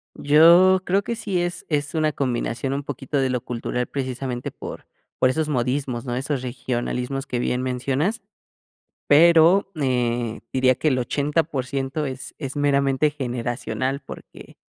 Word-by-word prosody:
Yo, 170 Hz, +5 st, +6 dB
creo 195 Hz, +3 st, +1 dB
que 235 Hz, -, -3 dB
sí 200 Hz, -5 st, -2 dB
es 175 Hz, 0 st, -3 dB
es 145 Hz, -2 st, -1 dB
una 155 Hz, -1 st, +1 dB
combinación 130 Hz, -1 st, -2 dB
un 140 Hz, +1 st, -3 dB
poquito 140 Hz, 0 st, -4 dB
de 135 Hz, -1 st, +1 dB
lo 125 Hz, -1 st, -1 dB
cultural 125 Hz, +1 st, -3 dB
precisamente 130 Hz, -2 st, -4 dB
por -, -, -9 dB, 0.3 s
por 130 Hz, -, +4 dB
esos 155 Hz, +3 st, -1 dB
modismos, 125 Hz, -2 st, -1 dB
¿no? 120 Hz, -2 st, -3 dB
Esos 135 Hz, +1 st, -2 dB
regionalismos 125 Hz, +1 st, -3 dB
que 125 Hz, -, -2 dB
bien 125 Hz, +1 st, -1 dB
mencionas. 135 Hz, -, -1 dB, 0.9 s
Pero 170 Hz, +5 st, +6 dB
eh, 120 Hz, -3 st, 0 dB
diría 130 Hz, -1 st, +3 dB
que 155 Hz, -, 0 dB
el 130 Hz, -3 st, +1 dB
80%, 140 Hz, 0 st, -1 dB
es 130 Hz, -1 st, -7 dB
es 135 Hz, -2 st, -5 dB
meramente 140 Hz, 0 st, +2 dB
generacional 125 Hz, -1 st, -3 dB
porque 140 Hz, -, -12 dB
135 Hz, 145 wpm, -23 LUFS, 125-150 Hz, 0.9 s, Yo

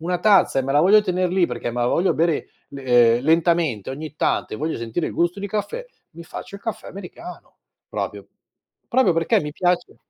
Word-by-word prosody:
una 175 Hz, +2 st, -1 dB
tazza 195 Hz, -8 st, +4 dB
e -, -, -2 dB
me 135 Hz, -, -3 dB
la 145 Hz, -, +4 dB
voglio 205 Hz, +6 st, +6 dB
tener 185 Hz, -2 st, 0 dB
lì 180 Hz, -1 st, +2 dB
perché 120 Hz, -1 st, -4 dB
me 120 Hz, -, -3 dB
la 120 Hz, -, +2 dB
voglio 180 Hz, +8 st, +2 dB
bere 165 Hz, -1 st, 0 dB, 0.2 s
le 120 Hz, -4 st, +3 dB
uhm, 125 Hz, -, -8 dB
lentamente 160 Hz, -, +2 dB
ogni 150 Hz, +3 st, -7 dB
tanto -, -, -1 dB
e -, -, -5 dB
voglio 155 Hz, +5 st, -2 dB
sentire 115 Hz, +8 st, -3 dB
il -, -, -7 dB
gusto 175 Hz, +3 st, 0 dB
di 200 Hz, -, -4 dB
caffè, 210 Hz, -, -3 dB, 0.3 s
mi 170 Hz, -, -11 dB
faccio 170 Hz, -, -9 dB
il 200 Hz, -, -9 dB
caffè 225 Hz, -1 st, -5 dB
americano 200 Hz, -, -10 dB, 0.3 s
proprio- -, -, -5 dB, 0.6 s
proprio 235 Hz, -8 st, +3 dB
perché 165 Hz, 0 st, +2 dB
mi 150 Hz, -, -5 dB
piace 180 Hz, +2 st, -1 dB
170 Hz, 210 wpm, -22 LUFS, 140-190 Hz, 0.6 s, voglio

